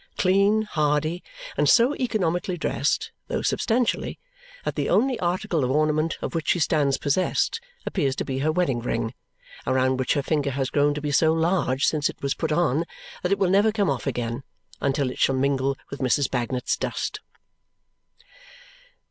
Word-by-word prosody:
Clean, 200 +3 +3
hardy, 155 -2 0 0.3
and - - +2
so 245 +4 +5
economically 185 - -1
dressed 145 -2 -1 0.2
(though - - -2
substantially) 240 +1 0 0.5
that - - -1
the - - -2
only 255 +2 +2
article 175 -2 0
of 125 - 0
ornament 155 +3 +1
of - - -3
which 165 -2 -3
she - - +3
stands 145 -3 +2
possessed 185 - 0 0.2
appear's 135 -3 0
to - - -3
be 135 -1 -3
her 155 +3 +1
wedding 155 -7 +1
ring, 115 -1 -2 0.5
around 130 0 +2
which 130 0 +1
her 140 - 0
finger 145 -2 0
has 135 -1 -2
grown 145 0 +2
to 150 - -4
be 145 -1 -2
so 160 +3 +4
large 160 -5 +1
since 150 -2 +1
it - - -9
was 140 - +1
put 160 -2 -3
on 155 -1 +2 0.4
that 180 - -1
it 200 - +3
will 185 -2 +2
never 205 +3 +4
come 205 -7 +1
off 135 - -3
again 120 +1 -2 0.4
until 140 -1 0
it - - -9
shall 135 - +3
mingle 135 0 +1
with 140 - -6
Mrs. 135 +2 +1
Bagnet's 125 0 -1
dust. - - -3
150 Hz, 175 wpm, -25 LUFS, 135-180 Hz, 0.5 s, so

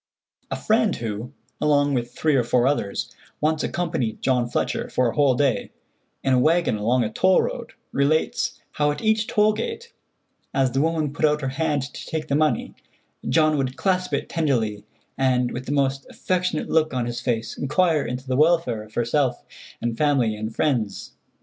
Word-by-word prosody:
A - - -2
friend 220 -1 +2
who, 115 +2 -5 0.3
along 145 -1 +3
with 120 -2 -1
three 155 -2 +2
or 125 - +3
four 120 +1 +2
others, 130 -8 -1 0.2
once 155 0 +1
accompanied 125 -10 -2
John 125 -2 +1
Fletcher - - -1
for 125 -2 +1
a - - -12
whole 140 -4 +4
day, 135 -1 +1 0.5
in 135 - +2
a 125 - +4
wagon 165 +1 +3
along 120 +4 +1
a 110 - -2
toll 185 +10 +3
road, - - -5 0.2
relates 145 +3 0
how 150 0 +1
at 145 - -3
each 220 0 +2
toll 215 0 +3
gate, 450 - -5 0.6
as 135 -2 +2
the 135 +2 +1
woman 155 -2 0
put 145 - -6
out 150 0 +3
her 135 - -1
hand 145 0 0
to - - -8
take 155 -1 -4
the 140 - +2
money, 155 0 +1 0.6
John 155 -1 +3
would 130 -1 -2
clasp 185 -1 0
it - - -3
tenderly, 115 -11 0 0.4
and, 125 -2 +2
with 125 +1 -6
the - - -2
most 135 -1 0
affectionate 180 -3 -1
look 155 -3 +1
on 125 -2 0
his 120 0 -4
face, 115 -2 -2
inquire 155 +1 +1
into 125 +1 -5
the 130 - 0
welfare 155 -6 +3
of 110 0 -14
herself 120 +1 0 0.4
and 120 -1 -1
family 135 -7 +2
and 110 +1 -4
friends. 115 -9 -1
140 Hz, 180 wpm, -23 LUFS, 120-155 Hz, 0.6 s, whole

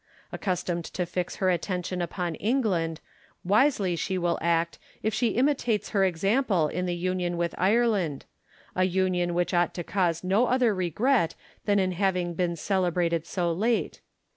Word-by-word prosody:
Accustomed 175 -3 -2
to 180 - 0
fix 180 +1 -3
her 185 -1 +2
attention 180 +1 -2
upon 175 0 -2
England, 185 - 0 0.4
wisely 205 0 +3 0.3
will 175 -1 0
she - - -9
act 170 0 +1 0.2
if 220 - 0
she 225 0 +1
imitates 250 -5 +1
her 195 -2 +2
example 190 - +2
in 180 0 -2
the 175 - -1
union 180 0 -1
with 170 0 -1
Ireland; 200 - +1 0.5
a 185 - +3
union 180 -1 0
which 175 +1 0
ought 175 0 +2
to 175 - -3
cause 175 -2 0
no 200 +7 +2
other 250 -3 +3
regret 185 - +1 0.3
than 205 -1 +3
in 190 -1 +2
having 180 -1 0
been 170 0 -1
celebrated 175 -2 0
so 175 -2 -1
late. 225 +6 0
185 Hz, 155 wpm, -27 LUFS, 175-205 Hz, 0.5 s, wisely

